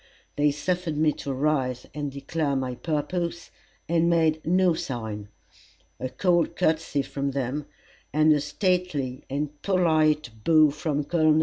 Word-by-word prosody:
they 145 0 +3
suffered 160 +2 -2
me 155 0 +3
to 140 - -5
rise 130 -3 0
and 145 -1 -3
declare 140 +1 -2
my 130 -1 -1
purpose, 170 +5 -3 0.4
and 170 0 +2
made 160 -2 +2
no 180 +1 +3
sign. 110 -8 -5 0.7
A 130 - -3
cold 175 +6 +1
courtesy 155 -3 +1
from 140 0 -3
them, 140 +2 -2 0.4
and 155 +1 +5
a 145 - +1
stately 150 -4 -1
and 145 +1 -3
polite 155 -7 +2
bow 155 -3 +5
from 150 0 -2
Col. 155 0 +3
150 Hz, 135 wpm, -26 LUFS, 140-165 Hz, 0.7 s, and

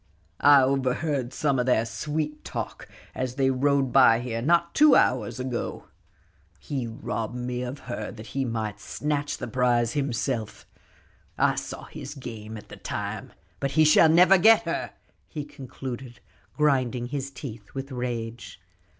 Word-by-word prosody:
"I 145 -2 +7
overheard 135 0 0
some 140 -3 0
o' - - +2
their 120 -3 +2
sweet 150 +7 -3
talk - - -6 0.3
as 130 -1 -3
they 135 -1 +2
rode 135 0 +2
by 125 -4 +6
here 120 -2 -3
not 170 +5 +2
two 300 -2 +6
hours 125 -1 +2
ago. 125 -2 -4 0.7
He 135 -5 -4
robbed 110 0 -4
me 125 0 -3
of 125 +3 -5
her 120 - -5
that 110 -1 -10
he 135 - 0
might 110 -4 -3
snatch 145 +8 -2
the 120 - -5
prize 120 -1 +1
himself; 130 -5 -2 0.7
I - - +3
saw - - -6
his 145 +3 -8
game 110 -5 -8
at 105 - -13
the - - -10
time. - - -5 0.3
But 140 0 -2
he 155 -1 +5
shall 155 +1 +6
never 180 +4 +6
get 225 +5 +6
her," - - -2 0.4
he 150 -3 -6
concluded, 130 -3 -8 0.4
grinding 130 -5 +1
his 135 -1 -3
teeth 125 -5 -9
with 135 +1 -5
rage. 120 -2 -5
130 Hz, 150 wpm, -26 LUFS, 120-145 Hz, 0.7 s, I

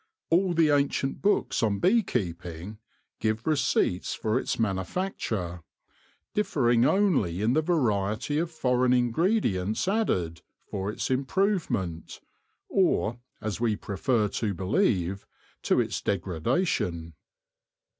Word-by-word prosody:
All 175 +1 +3
the 160 -2 +4
ancient 140 -1 0
books 205 +1 +1
on 105 -4 +1
bee 210 - +4
keeping 90 - -4 0.4
give 110 +1 -1
receipts 140 - +1
for 110 +3 0
its - - -2
manufacture, 95 - -2 0.7
differing 125 - +2
only 155 - +2
in 115 +3 +3
the 155 - +3
variety 125 - 0
of 170 0 -1
foreign 125 -5 +1
ingredients 120 - +1
added 90 - 0 0.2
for 95 0 -4
its 110 - -3
improvement, 130 - -1 0.5
or, 120 - +1 0.2
as 110 0 -3
we 115 -3 +2
prefer 105 +2 0
to 105 -1 -2
believe, 95 - 0 0.3
to - - +2
its - - -1
degradation. 90 - -1
115 Hz, 110 wpm, -27 LUFS, 95-160 Hz, 0.7 s, the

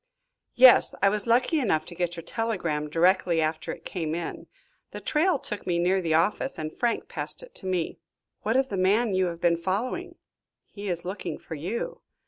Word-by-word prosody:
"Yes, 255 0 +7
I 200 - +7
was 210 +1 -2
lucky 250 +7 +3
enough 160 - +1
to 175 - -9
get 175 0 -2
your 165 - -7
telegram 170 -9 -2
directly 175 +1 +3
after 155 0 -1
it - - -9
came 160 -4 -3
in. 170 -1 -5 0.4
The - - -7
trail 315 +2 +2
took 210 -7 -6
me 175 -1 +1
near 185 +2 +2
the 165 -3 +1
office 210 +10 +1
and 155 0 -4
Frank 235 -2 0
passed - - -6
it - - -13
to 190 - -8
me." 180 -3 -1 0.4
"What - - +1
of 265 0 +2
the 195 - -3
man 200 +4 +3
you 185 -1 +2
have 170 -1 -5
been 170 -1 +3
following?" 195 +8 -2 0.5
"He 205 -1 -7
is 170 -1 -3
looking 190 +2 -4
for - - -9
you." 180 +10 -4
185 Hz, 195 wpm, -27 LUFS, 170-225 Hz, 0.5 s, Yes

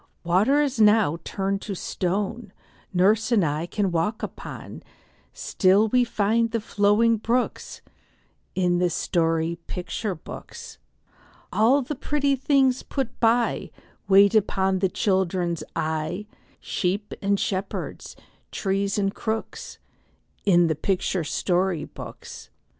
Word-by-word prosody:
Water 220 +13 +3
now 210 -6 +5
is 170 - -7
turned 195 0 -2
to 200 - -5
stone 195 +4 -3 0.4
Nurse 205 +6 +2
and 210 -7 +4
I 150 +3 -2
can 195 0 -1
walk 170 +7 -1
upon; - - -7 0.5
Still 200 +3 +2
we 250 +2 +4
find 230 0 +1
the 230 0 -1
flowing 210 +2 +2
brooks 240 +4 -2 0.7
In 180 -1 +2
the 180 - +2 0.8
picture 180 +3 -4
story - - -17
books. 465 -1 -10 0.7
All 250 +6 +4
the 275 - -4
pretty 285 0 0
things 265 -1 +2
put 265 -4 -4
by, 235 +1 +2 0.4
Wait 200 +1 +6
upon 190 -3 +2
the 190 0 +1
children's 180 -3 0
eye, 160 +5 -2 0.3
Sheep 200 +3 -2
and 200 0 +1
shepherds, 195 0 -4 0.4
trees 195 0 -1
and 195 -1 0
crooks, 220 0 -4 0.7
In 175 -3 +5
the 160 - +1
picture 185 +2 -1
story 175 0 0
books. - - -10
200 Hz, 120 wpm, -24 LUFS, 185-225 Hz, 0.8 s, Wait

